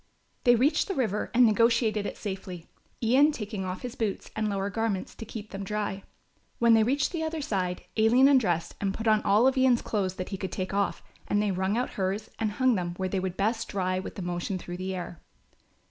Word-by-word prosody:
They 245 0 +7
reached 265 +7 +2
the 390 - -2
river 215 -5 -1
and 245 +1 +6
negotiated 220 -1 +3
it - - -6
safely, 190 -4 -6 0.4
Ian 265 +7 +5
taking 210 -7 -5
off 185 0 -5
his 245 -1 -5
boots 220 -6 -3
and 215 -1 0
lower 200 0 -2
garments 220 -3 -2
to 225 - -9
keep 215 -1 -8
them 195 0 -5
dry. 205 -1 -3 0.6
When 235 -1 +5
they 225 - +6
reached 270 +5 +1
the 335 -3 -3
other 320 0 -2
side 185 -10 -2
Aline 230 +5 +5
undressed 200 - +2
and 195 -1 -1
put 225 - -4
on 215 -1 +4
all 210 +4 +4
of 265 0 +3
Ian's 255 -2 +4
clothes 190 -4 -1
that 185 - -5
he 195 - -4
could 190 0 -5
take 185 0 -4
off 200 0 0 0.2
and 205 - +1
they 210 -1 +1
wrung 190 +3 0
out 250 - -1
hers 195 +3 -2
and 215 -2 -1
hung 260 +3 +3
them 175 -4 -2
where 185 -1 -2
they 190 - -1
would 185 -1 -4
best 225 +3 0
dry 185 -2 -1
with 190 - -7
the 190 - -5
motion 175 +2 -2
through 175 0 -7
the 190 +1 -3
air. 175 -2 -7
210 Hz, 225 wpm, -28 LUFS, 190-235 Hz, 0.6 s, They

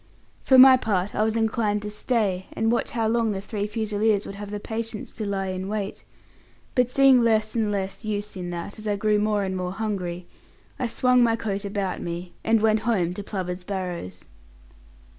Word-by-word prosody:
For 260 - +5
my 260 0 +10
part 205 -5 -1
I - - 0
was 220 +1 +1
inclined 220 -2 0
to 210 - -4
stay, 210 -4 -1
and 225 +1 +1
watch 235 - 0
how 225 -2 0
long 225 -1 +1
the 195 - -3
three 205 +1 -3
fusiliers 210 -1 0
would - - -6
have 205 0 -7
the 205 0 -4
patience 225 0 -5
to 215 - -4
lie 195 -1 -2
in 185 0 -4
wait; 205 -1 -4 0.7
but 250 -2 +2
seeing 270 -1 +5
less 220 -2 +2
and 220 -2 +1
less 195 +1 -3
use 210 -1 -3
in 180 -2 -5
that, 175 +5 -6
as 215 - -5
I 205 - +1
grew 210 0 +2
more 210 -1 +1
and 190 -1 -2
more 180 0 -3
hungry, 185 -5 -3 0.5
I 250 - 0
swung 250 +2 +3
my 230 -1 +4
coat 205 -3 -3
about 200 -2 -2
me, 175 +1 -5
and 225 -1 +3
went 220 0 +4
home 200 -7 0
to 205 - -6
Plover's 185 -3 -4
Barrows. 180 - -5
210 Hz, 200 wpm, -25 LUFS, 190-225 Hz, 0.7 s, my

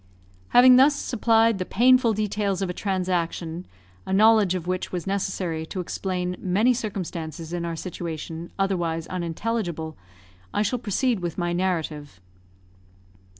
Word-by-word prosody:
Having 250 +1 +7
thus 280 +3 +6
supplied 225 -4 +2
the - - 0
painful 245 +4 +4
details 205 -2 -1
of 180 - -2
a - - -6
transaction, 180 -3 -2 0.4
a - - -6
knowledge 210 -1 +5
of 175 -2 -4
which 185 0 -3
was 175 -3 -4
necessary 185 -4 -2
to 190 - -5
explain 180 0 -3
many 205 +7 +2
circumstances 170 -7 -5
in 175 -1 -2
our 170 -1 -3
situation, 165 -1 -6
otherwise 175 -5 -1
unintelligible, 170 -2 -3 0.6
I 205 - +2
shall 245 +4 -1
proceed 235 +1 0
with 175 -2 -4
my 175 -1 -1
narrative. 160 - -2
185 Hz, 135 wpm, -24 LUFS, 170-215 Hz, 0.6 s, Having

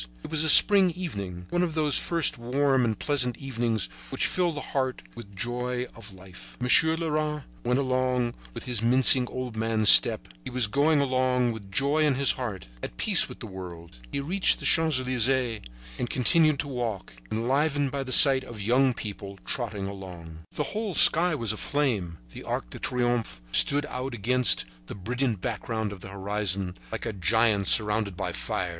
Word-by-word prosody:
It - - -10
was 160 -1 +2
a 160 - +1
spring 195 +3 +7
evening, 100 - -7
one 175 - 0
of 170 -3 -2
those 150 -3 0
first 165 -7 0
warm 130 +1 0
and 110 -2 -2
pleasant 125 -5 0
evenings 120 -6 -3 0.2
which - - -1
fill 180 -2 -1
the 150 - -8
heart 130 -2 -3
with 115 -4 -12
the 100 - -19
joy 125 +4 -3
of 110 -2 -12
life. 90 -11 -15
Monsieur 160 +6 +2
Leras 155 -2 -3 0.2
went 125 +1 0
along 130 -2 -1 0.2
with - - -7
his 120 -4 -3
mincing 125 +1 +4
old 125 -2 -7
man's 110 -1 +2
step; - - +7 0.2
he - - -8
was 125 -2 +2
going 145 +7 +1
along 130 -2 0
with 100 -4 -10
joy 140 +8 0
in 150 -3 +2
his 140 +1 +3
heart, 110 - -6 0.2
at - - -8
peace - - +2
with - - -13
the - - -7
world. 85 - -11
He - - -3
reached 180 +8 0
the - - -9
Champs 160 -5 +2
Elysees, 125 -2 0 0.7
and 120 - -3
he - - -3
continued 155 +4 +3
to 145 - -9
walk, 120 - -5 0.2
enlivened 140 +5 -1
by 140 - -4
the 130 - -8
sight 135 -1 +9
of 120 -3 -11
the 105 - -7
young 125 +3 +1
people 100 -2 -8
trotting 110 -6 -4
along. 90 -5 -10
The 150 - -3
whole 210 -4 -4
sky 170 0 +6
was 115 -6 0
aflame; 110 - -3
the - - -11
Arc - - -5
de - - -9
Triomphe 120 - -2
stood 145 - +4
out 130 -3 -6
against 120 - +2 0.2
the - - -8
brilliant 120 +1 -4
background 110 -1 -4
of 100 - -10
the 95 - -10
horizon, 100 -1 -1 0.2
like - - -6
a - - -4
giant 100 +1 0
surrounded 105 -3 +1
by - - -4
fire. - - -4
125 Hz, 190 wpm, -25 LUFS, 105-140 Hz, 0.7 s, sight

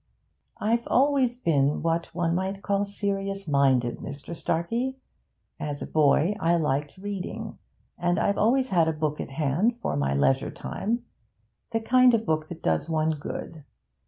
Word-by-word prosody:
'I've 230 +3 0
always 265 -2 +3
been 150 - +1
what 165 0 0
one 170 -1 -1
may 190 +2 -1
call 200 +1 -1
serious 195 -1 -3
minded, 135 -4 +2
Mr. 145 +4 -7
Starkey. 230 +13 -1 0.6
As 145 -1 -4
a - - -4
boy 155 +4 +3
I 170 -1 +3
liked 150 -2 -1
reading, 200 -1 -5 0.4
and 175 0 +1
I've 200 - +1
always 255 +4 +3
had 170 -5 +3
a 160 - +1
book 155 -1 -2
at - - -6
hand 160 - +1
for - - -2
my 70 -1 0
leisure 70 -1 +2
time 235 +3 -3 0.6
the 225 -1 0
kind 250 +1 +5
of 225 0 -1
book 155 -2 0
that 165 0 -9
does 80 - 0
one 160 0 +1
good. 155 +1 -6
170 Hz, 160 wpm, -26 LUFS, 150-210 Hz, 0.6 s, kind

